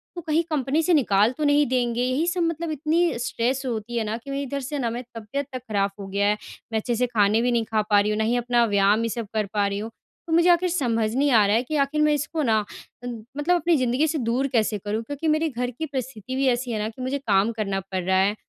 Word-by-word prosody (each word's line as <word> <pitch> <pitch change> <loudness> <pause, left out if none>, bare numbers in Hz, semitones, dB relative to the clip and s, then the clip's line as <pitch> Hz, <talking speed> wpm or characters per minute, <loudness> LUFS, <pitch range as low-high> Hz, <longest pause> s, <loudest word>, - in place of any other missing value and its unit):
तो 345 - -5
कहीं 315 +2 +2
कंपनी 290 +2 +1
से 360 - +2
निकाल 215 -6 +3
तो 305 - -2
नहीं 290 0 +4
देंगे? 245 -2 0
यही 260 +6 +1
सब 350 0 0
मतलब 330 0 -2
इतनी 310 -1 +1
स्ट्रेस 250 +2 -1
होती 235 0 -3
है 225 - +1
ना 215 +1 -2
कि 275 +4 -9
मैं 275 +1 -2
इधर 280 +1 -3
से 290 +3 -4
ना 235 -3 0
मैं 240 +2 -5
तबीयत 230 +6 -4
तक 255 - -3
खराब 200 -1 +1
हो 195 - -6
गया 200 +1 0
है। 210 +1 +2 0.3
मैं 220 - +1
अच्छे 240 +2 -2
से 250 +2 +1
खाने 215 -1 +2
भी 245 0 +1
नहीं 230 -2 +1
खा 220 -1 0
पा 205 -1 +5
रही 205 +1 +1
हूँ, 210 - -1
ना 220 - +1
ही 235 +2 +1
अपना 240 0 +2
व्यायाम 205 +1 +3
ये 230 - -1
सब 230 -1 -4
कर 215 -1 0
पा 205 -1 +2
रही 200 0 -3
हूँ। 220 +2 -5 0.4
तो 325 - -2
मुझे 340 +2 +5
आखिर 350 +1 +4
समझ 230 -9 0
नहीं 285 +2 +2
आ 215 -3 +6
रहा 205 - +3
है 235 - +2
कि 305 +4 -4
आखिर 285 +2 +1
मैं 300 0 +4
इसको 300 +2 -2
ना 220 -3 +3 0.5
अ, - - -5 0.3
मतलब 345 +5 +2
अपनी 340 0 +2
ज़िंदगी 255 +5 +1
से 310 +1 -1
दूर 250 +2 0
कैसे 215 -1 +2
करूँ? 210 +3 -3
क्योंकि 285 +6 -4
मेरे 310 +1 +2
घर 250 -1 -3
की 315 +7 -5
परिस्थिति 260 -4 -5
भी 270 0 +1
ऐसी 245 0 0
है 215 - -2
ना 215 - -2
कि 255 +3 -11
मुझे 260 +2 -1
काम 200 +3 +3
करना 195 -2 -1
पड़ 185 -1 -2
रहा 190 +1 +2
है। 200 +2 +2
245 Hz, 275 wpm, -24 LUFS, 215-290 Hz, 0.5 s, आ